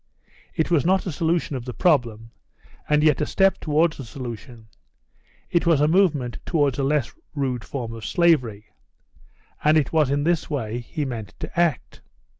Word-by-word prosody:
It 160 - 0
was 160 -5 +3
not 190 +3 +2
a 180 - -2
solution 165 -1 -1
of 125 - -4
the 125 - -6
problem, 115 -9 +1 0.6
and 150 0 +3
yet 155 -1 +3
a 150 - 0
step 195 -1 +2
towards 155 +1 +1
the 135 - -7
solution; 120 -1 -8 0.9
it 170 0 +1
was 165 -4 +4
a 150 - +3
movement 155 -8 +1
towards 145 -6 0
a - - +1
less 145 -1 0 0.2
rude 130 -4 -2
form 120 -5 -5
of 115 -1 -9
slavery. 125 - +1 0.9
And 155 +1 +5
it 150 -1 0
was 155 -4 +3
in 145 +1 0
this 165 0 0
way 120 -6 -3
he 145 +5 -4
meant 115 -6 -6
to - - -4
act. 170 -3 0
145 Hz, 175 wpm, -23 LUFS, 125-165 Hz, 0.9 s, And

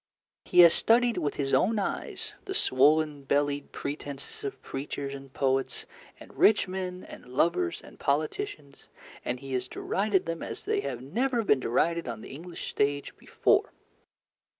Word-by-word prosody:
He 180 - +6
has 170 -1 +9
studied 235 +1 +4
with 145 - -1
his 135 -1 -2
own 220 +4 +3
eyes 200 - -3
the 385 - -4
swollen 150 - +3
bellied 145 +1 0
pretences 140 -1 -6
of 135 -1 -4
preachers 140 0 -5
and 135 -1 -9
poets 135 0 0 0.3
and - - -14
rich 210 -2 +5
men 185 -1 -4
and - - -12
lovers 125 - +1
and - - -15
politicians, 150 - -2 0.3
and 125 +1 -2
he 135 0 -7
has 125 0 -1
derided 195 +4 0
them 165 0 -4
as - - -6
they 420 0 0
have 125 - -4
never 235 - 0
been 145 -10 +3
derided 165 +8 +1
on 115 -2 -5
the - - -10
English 170 +4 -7
stage 145 0 0
before. - - +1
145 Hz, 155 wpm, -28 LUFS, 135-185 Hz, 0.3 s, has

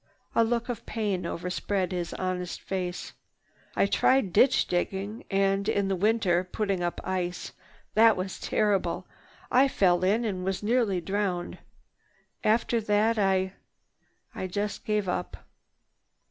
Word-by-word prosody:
A 230 - +4
look 235 +1 0
of 245 -3 -4
pain 200 -6 -2
overspread 180 +2 -2
his 175 -2 -3
honest 180 -1 -3
face. 180 -2 -4 0.6
"I - - +3
tried 215 -1 +2
ditch 255 +5 +5
digging 195 +4 -2
and, 195 +1 +1
in 195 -3 0
winter, 200 -4 +2
putting 195 0 -2
up 175 0 -2
ice. 180 -1 -3 0.4
That 225 -1 +6
was 185 0 -4
terrible. 205 -2 0 0.5
I 265 +2 +5
fell 180 -8 +2
in 215 +5 +2
and 190 -4 -2
was 190 +2 -2
nearly 215 -5 +1
drowned. 190 -1 -2 0.8
After 225 +1 +2
that 215 +1 +2
I—I 190 -1 -4
just 205 +3 -3
gave 210 -2 0
up. 180 0 -3
195 Hz, 125 wpm, -27 LUFS, 185-215 Hz, 0.8 s, That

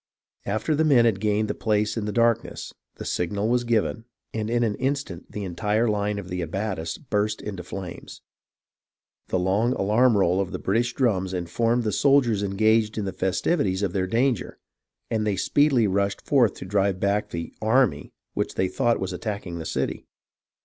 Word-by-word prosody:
After 110 +9 0
the 155 +1 +2
men 135 -6 +5
had 110 -4 +2
gained 105 +1 +1
the - - -1
place 105 -1 0
in 110 -3 -2
the 105 - -2
darkness, 115 0 0 0.2
the - - -8
signal 100 +4 -1
was 120 0 +2
given, 115 -1 0 0.3
and 110 -1 -2
in 120 0 +1
an 110 -3 +1
instant 135 -9 -3
the 105 - -5
entire 105 +5 0
line 105 -1 0
of 100 -3 -6
the 90 -1 -3
abatis 85 -1 -3
burst 110 -5 -1
into 100 -4 -6
flames. 90 0 -8 1.0
The - - 0
long 100 +7 +1
alarm 110 +2 +3
roll 95 0 +3
of 95 -1 -4
the - - -2
British 115 +5 0
drums 95 -8 +1
informed 115 +7 0
the 110 - 0
soldiers 130 -7 +3
engaged 110 +2 +2
in 105 - -1
the 95 - -3
festivities 95 - 0
of 95 -3 -1
their 95 -1 0
danger, 120 +2 0 0.5
and 110 -1 +1
they 105 -2 0
speedily 140 +2 +3
rushed 100 0 0
forth 125 -8 +3
to - - -8
drive 100 -1 +1
back 100 +2 0
the 85 -1 -5
"army" 115 +2 +2 0.2
which - - -2
they 95 - +1
thought 120 +3 +1
was 95 -1 -3
attacking 90 -2 -4
the 80 - -5
city. - - -3
105 Hz, 180 wpm, -25 LUFS, 95-115 Hz, 1.0 s, men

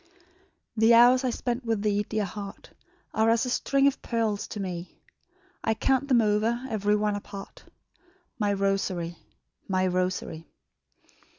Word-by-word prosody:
"The 225 +1 +5
hours 245 +2 +6
I 255 - +1
spent 245 +1 -3
with 225 -3 -1
thee, 205 -1 +2
dear 215 0 -2
heart, 200 +1 -8 0.4
Are 220 +1 +3
as 230 +2 +3
a 250 - -2
string 275 +2 +2
of 280 - +2
pearls 225 -3 -1
to 210 - -7
me; 180 -2 -5 0.7
I 220 - +1
count 270 +4 +1
them 250 -4 +4
over, 215 +2 +1
ev'ry 210 -1 +1
one 210 0 0
apart, 200 -1 -9 0.7
My 205 -2 +1
rosary, 195 -4 -1 0.5
my 185 -1 +1
rosary." 180 -3 -2
210 Hz, 140 wpm, -27 LUFS, 195-235 Hz, 0.7 s, hours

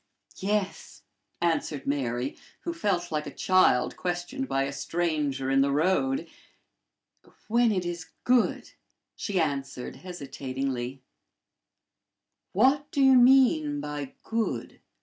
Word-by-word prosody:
"Yes," 200 0 -2 0.4
answered 165 -4 0
Mary, 130 -2 -1 0.3
who 340 - -3
felt 190 - -1
like 150 -1 -2
a - - -5
child 185 -9 +3
questioned 180 +10 -3
by 135 0 +1
a 140 +1 -3
stranger 145 -3 -1
in 135 0 +4
the 140 - +3
road; 190 - +1 0.6
" - - -30
when 235 +1 +3
it 185 -3 -1
is 170 -2 -4 0.2
good," 245 -1 +2 0.4
she 200 -4 -2
added, 135 -5 -2
hesitatingly. 135 -6 -5 1.5
"What 270 +8 +3
do - - -3
you 265 -1 +7
mean 270 +4 +5
by 145 - -5
good?" 225 0 -3
175 Hz, 115 wpm, -27 LUFS, -, 1.5 s, you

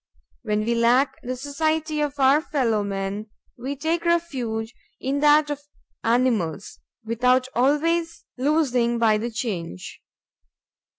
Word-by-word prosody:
When 210 -3 -1
we 235 - +1
lack 240 +4 +2
the 255 +1 -4
society 310 +3 -1
of 290 -1 -2
our 275 +3 +5
fellow 235 -9 0
men, 200 +1 -4 0.3
we 265 +4 -5
take 325 +4 -1
refuge 255 -10 -1 0.3
in 275 +2 -1
that 295 0 +4
of 290 0 -4 0.4
animals, 225 -7 0 0.3
without 250 +3 +2
always 330 +6 +1
losing 255 -4 +1
by 220 -2 +3
the 235 +2 -3
change. 185 - -5
255 Hz, 120 wpm, -24 LUFS, 225-295 Hz, 0.4 s, our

